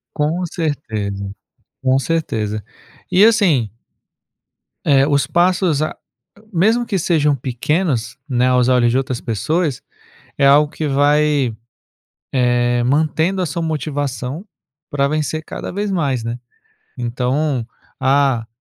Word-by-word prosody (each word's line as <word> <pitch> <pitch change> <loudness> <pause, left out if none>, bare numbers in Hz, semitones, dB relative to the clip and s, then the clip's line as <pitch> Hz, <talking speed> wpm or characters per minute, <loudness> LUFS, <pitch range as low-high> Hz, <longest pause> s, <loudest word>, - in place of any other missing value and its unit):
Com 160 +4 0
certeza, 110 - -3 0.5
com 130 0 +3
certeza. 110 -10 -2 0.5
E 190 - +4
assim 180 - +4 1.2
Eh, 135 -1 +5
os 140 -4 +2
passos, 175 -1 +2
a 155 - +1
ag - - -12 0.6
mesmo 220 +8 +3
que 200 -5 -1
sejam 150 -3 +2
pequenos, 130 0 -1
né, 125 -1 +2
aos 125 -1 +3
olhos 125 -2 +3
de 125 - +2
outras 130 -2 -2
pessoas, 140 - -1 0.6
é 140 - +2
algo 145 +2 +5
que 155 - -3
vai, 145 -2 +2 0.8
eh, 120 -1 +2
mantendo 160 +7 +1
a 180 - +1
sua 165 +3 -3
motivação 145 - -3 0.4
pra 140 -1 +1
vencer 155 +1 -2
cada - - -6
vez 205 +2 -2
mais, 140 -10 0
né. 115 +1 -3 0.6
Então, 125 +2 -1 0.3
ah, 135 -4 +2
140 Hz, 125 wpm, -19 LUFS, 125-160 Hz, 1.2 s, Eh